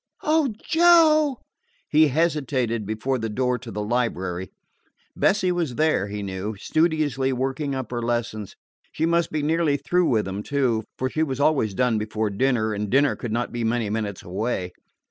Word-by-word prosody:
"Oh, 305 -4 +2 0.2
Joe!" 320 -4 +5 0.5
He 155 +1 +5
hesitated 130 - 0
before 120 +5 -1
the 115 0 -3
door 125 +3 0
to 125 - -10
the 105 -1 -4
library. 95 -6 -2 0.7
Bessie 190 -2 +2
was 170 -8 -2
there, 155 -9 +1
he 105 0 -5
knew, 100 +2 -4
studiously 150 - +1
working 135 +2 -2
up 130 -3 -5
her 120 -1 -2
lessons. 115 -3 -3 0.4
She 160 - -1
must 170 0 +1
be 155 -1 -1
nearly 155 -1 +2
through 175 +5 +1
with 110 -4 +2
them, 95 +2 -4
too, 120 -4 0
for 130 - -1
she 155 +4 -2
was 135 -4 -1
always 140 -9 +2
done 120 -2 +2
before 105 0 -2
dinner, 110 0 +1
and 105 0 -3
dinner 135 -1 +3
could 115 +1 -6
not 120 +2 -1
be 120 -1 -3
many 115 -2 0
minutes 105 -3 -3
away. 95 -1 -3
125 Hz, 170 wpm, -24 LUFS, 110-155 Hz, 0.7 s, Joe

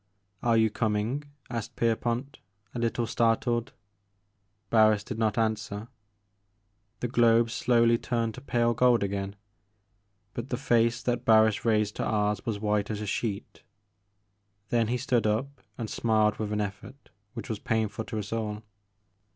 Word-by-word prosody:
"Are 115 -1 +3
you 110 -1 +3
coming," 110 +6 -1 0.3
asked 115 -3 -4
Pierpont, 120 +4 -1 0.3
a 120 - -4
little 115 0 0
startled. 115 +2 +1 1.0
Barris 110 -2 +5
did 105 - -6
not 110 -1 +1
answer. 110 -1 -1 1.1
The 125 - 0
globe 115 -1 +4
slowly 115 -1 +3
turned 115 -2 -1
to 130 - -10
pale 120 -3 +1
gold 120 -1 +3
again, 100 0 -3 0.5
— 100 0 -45
^but 120 +2 -5
the 125 - -1
face 120 -3 +2
that 120 -1 -1
Barris 110 -1 +4
raised 105 -2 +1
to - - -1
ours 105 -1 0
was 110 -3 -1
white 105 -1 0
as 105 -2 -3
a 105 - -4
gheet. 100 0 -3 1.1
Then 115 -2 +2
he 125 +2 0
stood 125 -4 +1
up, 130 +6 -2 0.2
and 115 - -4
smiled 110 -1 +1
with 105 -1 -3
an 105 - 0
e£fort 105 +5 -4 0.4
which - - -6
was 110 -3 -4
painful 110 0 -1
to 115 - -5
us 105 +1 -4
all. 105 -1 -3
115 Hz, 150 wpm, -28 LUFS, 105-120 Hz, 1.1 s, Barris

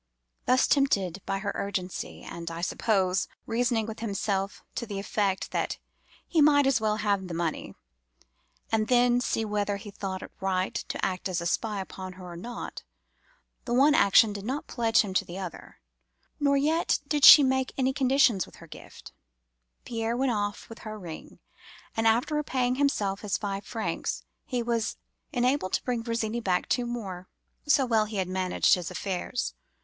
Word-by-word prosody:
"Thus 255 +1 +4
tempted 200 - +1
by 195 - 0
her 200 +1 -2
urgency, 190 -2 -4
and, 170 -1 -6
I 165 0 -6
suppose, 190 0 +1 0.2
reasoning 230 -1 +1
with 220 0 -7
himself 200 -2 -2
to 235 - -4
the 205 -2 -5
effect 195 -1 -1
that - - -1 0.5
he 325 - +2
might 285 -1 +6
as 265 -4 +3
well 215 -1 +1
have 200 -3 0
the 170 - -5
money, 165 -2 -3 1.0
and 215 -1 +1
then 245 0 +4
see 225 -2 -1
whether 205 -1 -1
he 200 +1 -9
thought 190 -1 -5
it - - -10
right 190 -1 0
to - - -3
act 185 0 -2
as 180 -1 -1
a 170 - -5
spy 210 +4 -1
upon 190 -1 -7
her 185 0 -11
or - - -8
not—the 240 - -10
one 285 +4 +6
action 210 - +5
did 200 -1 -6
not 275 +8 -3
pledge 230 -2 +2
him 200 -3 -4
to - - +2
the 175 - -8
other, 185 -4 -8 0.6
nor 280 -1 +3
yet 315 +4 +2
did 295 -1 0
she 290 - +12
make 265 0 +1
any 265 0 +1
conditions 260 - +3
with - - -16
her - - -13
gift—Pierre - - -8
went 265 0 +1
off 205 -2 -2
with 225 - -11
her 215 -1 -7
ring; 170 -6 -9 0.6
and, 225 0 +2
after 235 +7 +2
repaying 260 -4 0
himself 205 -9 +1
his 210 -2 -1
five 200 -1 -4
francs, 225 -2 -3 0.2
he 245 -2 -2
was 230 -2 -1 0.3
enabled 250 -5 +1
to - - +1
bring 245 -2 -1
Virginie 230 -1 -2
back 185 -4 0
two 245 -1 0
more, 195 -7 -5 0.4
so 280 -2 +4
well 225 -3 +2
had 205 -3 -2
he 185 - -6
managed 185 -1 +2
his 180 -2 0
affairs. 195 +5 -3
215 Hz, 175 wpm, -28 LUFS, 190-245 Hz, 1.0 s, she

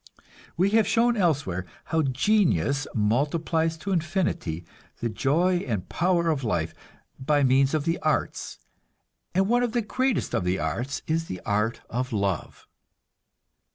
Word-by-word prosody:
We 190 +3 +3
have 220 -1 +4
shown 235 +1 +3
elsewhere 140 - 0 0.2
how 160 0 0
genius 145 - +2
multiplies 155 +9 +1
to 195 +5 -5
infinity 165 - -1 0.3
the 115 - -1
joy 160 - +2
and 105 - -3
power 170 -1 +1
of 140 -4 -2
life 85 -8 -1 0.5
by 145 +2 +2
means 135 +2 +4
of 150 -2 -1
the 165 +1 0
arts; 155 -1 -1 0.8
and 190 +1 +3
one 240 +2 +3
of 240 -2 0
the 240 - +1
greatest 260 +4 0
of - - +1
the 90 +1 0
arts 115 - -3
is 165 +1 0
the 90 - -6
art 105 +3 0
of 125 +2 -3
love. 100 -6 -2
145 Hz, 145 wpm, -26 LUFS, 110-175 Hz, 0.8 s, have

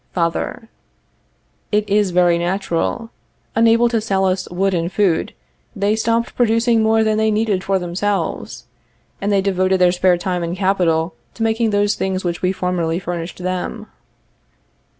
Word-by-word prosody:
Father. 170 +6 -2 1.0
It 210 0 +1
is 205 -1 +2
very 175 -1 +3
natural. 190 +5 -2 0.4
Unable 230 +1 +4
to 230 -2 0
sell 195 -3 0
us 185 0 -1
wood 190 +2 0
and 170 0 -1
food, 190 -6 0 0.4
they 205 +1 +1
stopped 230 +1 0
producing 230 -1 +2
more 220 0 +3
than 215 0 +1
they 220 0 +2
needed 210 -3 0
for 195 0 +1
themselves, 190 +3 -3 0.6
and 200 +1 0
they 200 -1 +3
devoted 190 -1 +1
their 180 -1 +5
spare 180 0 +2
time 180 0 -2
and 170 +2 -3
capital 180 -4 +1 0.2
to 225 - -3
making 225 0 +1
those 205 0 +2
things 190 0 -2
which 175 -1 -3
we 185 - +1
formerly 180 -3 -1
furnished 175 0 -5
them. 185 +4 -3
190 Hz, 150 wpm, -19 LUFS, 180-220 Hz, 1.0 s, their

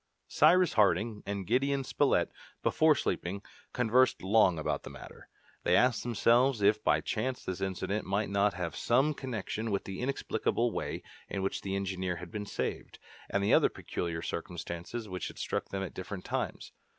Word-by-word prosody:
Cyrus 175 +3 +5
Harding 105 +1 +2
and 100 -1 -3
Gideon 135 +5 +1
Spilett, - - +2 0.3
before - - +4
sleeping, 100 +4 -2 0.3
conversed 125 -1 +3
long 95 -3 +4
about 80 - -1
the - - -9
matter. - - -12 0.3
They - - +3
asked 125 -3 +3
themselves 120 0 +3
if 105 +1 +4
by - - +3
chance 125 +4 -2
this 95 0 -4
incident 95 +2 -2
might 100 +2 0
not 100 -1 +2
have 90 -2 -3
some 135 +6 +2
connection 115 -4 -4
with 100 -2 -1
the 95 -1 -6
inexplicable 120 -2 0
way - - -4 0.3
in 95 - -3
which 95 - -1
the 95 0 -3
engineer 95 -2 -2
had 85 0 -9
been 105 -1 -5
saved, - - -4 0.3
and 100 - 0
the 100 - +3
other - - +6
peculiar 85 -1 -4
circumstances 85 +6 -5
which 90 -3 -4
had - - -10
struck - - -3
them 95 0 -3
at 95 - -6
different 95 0 -6
times. - - -3
100 Hz, 170 wpm, -31 LUFS, 95-120 Hz, 0.3 s, other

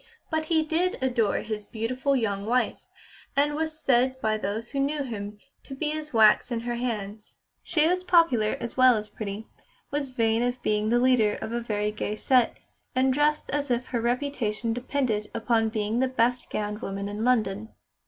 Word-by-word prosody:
But 315 0 0
he 315 0 +2
did 335 +4 0
adore 240 -5 +1
his 215 -1 -4
beautiful 255 +6 -1
young 200 -5 -1
wife, 250 +2 0 0.5
and 290 +1 +2
was 315 +1 -3
said 260 -2 +2
by 220 -3 +1
those 215 +2 -4
who 275 - -2
knew 285 +1 0
him 210 -4 -6 0.3
to 270 - -8
be 300 +2 -1
as 305 -1 -4
wax 220 +1 +5
in 230 -1 -1
her 240 +1 -3
hands. 220 -4 -4 0.2
She 310 -1 +2
was 365 +1 +1
popular, 330 -12 +3
as 235 - -5
well 255 -2 +6
as 210 0 -4
pretty; 210 0 -6 0.5
was 285 -1 -1
vain 230 -2 +1
of 245 +1 -1
being 210 0 +1
the 240 - +3
leader 240 -4 +3
of 220 - -5
a 235 0 -2
very 210 -2 -1
gay 210 0 -3
set, 250 +1 +2 0.4
and 260 0 +3
dressed 300 +2 +1
as 285 0 -1
if 245 +1 -1
her 240 -2 -1
reputation 235 -3 -1
depended 245 -4 -1
upon 225 -1 +1
being 215 +1 -1
the 260 - +2
best 250 -1 0
gowned 210 +1 -3
woman 195 -1 -4
in 205 +2 -4
London. 220 -3 +1
240 Hz, 185 wpm, -26 LUFS, 215-270 Hz, 0.5 s, well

